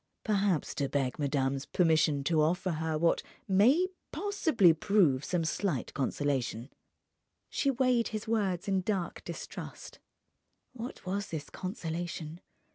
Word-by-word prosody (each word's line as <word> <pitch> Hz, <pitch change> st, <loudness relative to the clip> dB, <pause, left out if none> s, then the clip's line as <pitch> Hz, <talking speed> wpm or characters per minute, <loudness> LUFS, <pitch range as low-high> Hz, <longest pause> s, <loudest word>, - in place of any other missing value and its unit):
"Perhaps 200 Hz, -6 st, +1 dB
to 140 Hz, -2 st, -1 dB
beg 135 Hz, -2 st, -1 dB
madame's 135 Hz, -2 st, 0 dB
permission 160 Hz, -4 st, +3 dB
to 155 Hz, +2 st, +2 dB
offer 175 Hz, +4 st, +1 dB
her 160 Hz, -1 st, -1 dB
what 165 Hz, +2 st, +2 dB, 0.3 s
may 235 Hz, -, +5 dB, 0.3 s
possibly 320 Hz, -, +3 dB
prove 160 Hz, -6 st, +3 dB
some 175 Hz, -3 st, 0 dB
slight 190 Hz, +4 st, -1 dB
consolation." 135 Hz, -3 st, -1 dB, 0.8 s
She 280 Hz, -, +1 dB
weighed 250 Hz, -3 st, +2 dB
his 215 Hz, 0 st, -5 dB
words 200 Hz, -5 st, 0 dB
in 195 Hz, -1 st, +2 dB
dark 185 Hz, -3 st, -2 dB
distrust. -, -, -8 dB, 0.7 s
What 240 Hz, -4 st, -7 dB
was 200 Hz, +3 st, -2 dB
this 150 Hz, -3 st, -6 dB
consolation? 170 Hz, -3 st, -5 dB
175 Hz, 120 wpm, -31 LUFS, 150-205 Hz, 0.8 s, may